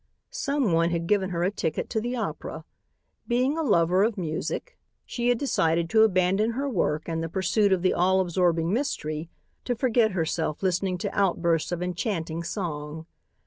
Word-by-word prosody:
Someone 270 Hz, -, +1 dB
had 170 Hz, -1 st, -1 dB
given 195 Hz, 0 st, +1 dB
her 170 Hz, -1 st, -1 dB
a 185 Hz, -, +1 dB
ticket 160 Hz, -6 st, -2 dB
to 220 Hz, -, 0 dB
the 245 Hz, +2 st, -2 dB
opera. 230 Hz, -, -5 dB, 0.6 s
Being 255 Hz, +4 st, +1 dB
a 325 Hz, -, -1 dB
lover 185 Hz, -, +3 dB
of 220 Hz, 0 st, 0 dB
music, 175 Hz, -, -4 dB, 0.3 s
she 240 Hz, 0 st, -1 dB
had 245 Hz, -, +3 dB
decided 165 Hz, -, +1 dB
to 220 Hz, -, +5 dB
abandon 195 Hz, +2 st, +3 dB
her 275 Hz, +4 st, -2 dB
work 155 Hz, -, 0 dB
and 165 Hz, -1 st, -2 dB
the 165 Hz, -, -3 dB
pursuit 195 Hz, +3 st, +1 dB
of 185 Hz, -2 st, +2 dB
the 185 Hz, -, +3 dB
all 190 Hz, +2 st, +3 dB
absorbing 175 Hz, -1 st, +1 dB
mystery, 160 Hz, -, -2 dB, 0.3 s
to 245 Hz, -, -1 dB
forget 235 Hz, -3 st, +2 dB
herself 160 Hz, -1 st, -2 dB
listening 185 Hz, 0 st, 0 dB
to -, -, -4 dB
outbursts 170 Hz, -5 st, +1 dB
of 175 Hz, 0 st, -2 dB
enchanting 175 Hz, -3 st, -2 dB
song. 160 Hz, -4 st, -5 dB
185 Hz, 170 wpm, -26 LUFS, 165-220 Hz, 0.6 s, to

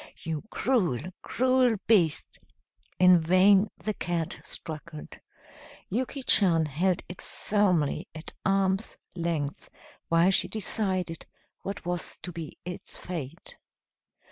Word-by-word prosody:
You 160 Hz, -2 st, -3 dB
cruel, 205 Hz, -, +1 dB, 0.2 s
cruel 255 Hz, -2 st, +2 dB
beast!" 175 Hz, -9 st, +2 dB, 0.6 s
In 180 Hz, -1 st, +7 dB
vain 190 Hz, +5 st, +5 dB
the 215 Hz, -, -3 dB
cat 170 Hz, -4 st, -3 dB
struggled. 155 Hz, 0 st, -7 dB, 0.7 s
Yuki 260 Hz, +5 st, -2 dB
Chan 170 Hz, -9 st, +4 dB
held 170 Hz, +5 st, 0 dB
it 180 Hz, -, -9 dB
firmly 185 Hz, -8 st, 0 dB
at 160 Hz, -, -7 dB
arm's 195 Hz, +2 st, +1 dB, 0.2 s
length 165 Hz, -5 st, -3 dB, 0.4 s
while 170 Hz, +3 st, +4 dB
she -, -, +3 dB
decided 190 Hz, -5 st, 0 dB, 0.3 s
what 195 Hz, -2 st, -6 dB
was 175 Hz, -1 st, -4 dB
to 180 Hz, -, -5 dB
be 165 Hz, -3 st, -8 dB
its 180 Hz, 0 st, -6 dB
fate. 165 Hz, -2 st, -7 dB
180 Hz, 110 wpm, -28 LUFS, 165-200 Hz, 0.7 s, In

